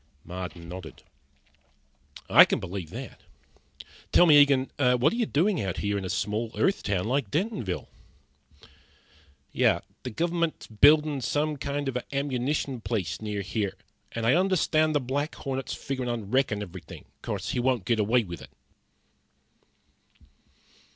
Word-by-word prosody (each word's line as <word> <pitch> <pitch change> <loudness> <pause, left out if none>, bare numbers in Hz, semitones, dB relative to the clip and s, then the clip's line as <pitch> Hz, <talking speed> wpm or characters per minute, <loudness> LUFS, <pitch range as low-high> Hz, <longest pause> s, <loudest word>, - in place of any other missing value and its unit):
Marden 90 -2 -7
nodded. 85 -5 -9 1.2
"I - - +9
can - - 0
believe 90 -3 -6
that. - - -8 0.9
Tell 175 - +7
me, 150 -3 +8
Eagen, 135 -2 +3
what 125 +2 +3
are - - -2
you 235 -2 0
doing 180 - +1
out 95 -3 -3
here 100 0 -1
around 95 - -4
a - - -4
small 105 +5 -1
Earth 195 - +2
town 95 -3 -1
like 125 -1 0
Dentonville?" 155 - -2 1.7
"The - - +3 0.3
gov'ment's 170 +5 -1
buildin' 145 +5 +4
some 150 +5 0
kind 140 0 -3
of 135 - -2
a 125 +2 -5
ammunition 135 -1 -1
place 110 -7 -3
near 105 -2 -3
here, 100 0 -2 0.4
and 115 -1 -3
I 120 - +5
understand 160 -4 +2
the - - +4
Black 140 +4 -2
Hornet's 135 -1 -4
figurin' 130 -2 -4
on 115 -4 -4
wreckin' 125 -6 +1
everything. 90 -4 -10 0.2
'Course - - -4
he - - -1
won't 120 -5 +1
get 115 -2 +1
away 115 +4 +3
with 85 -4 -8
it." - - -12
125 Hz, 145 wpm, -27 LUFS, 105-145 Hz, 1.7 s, I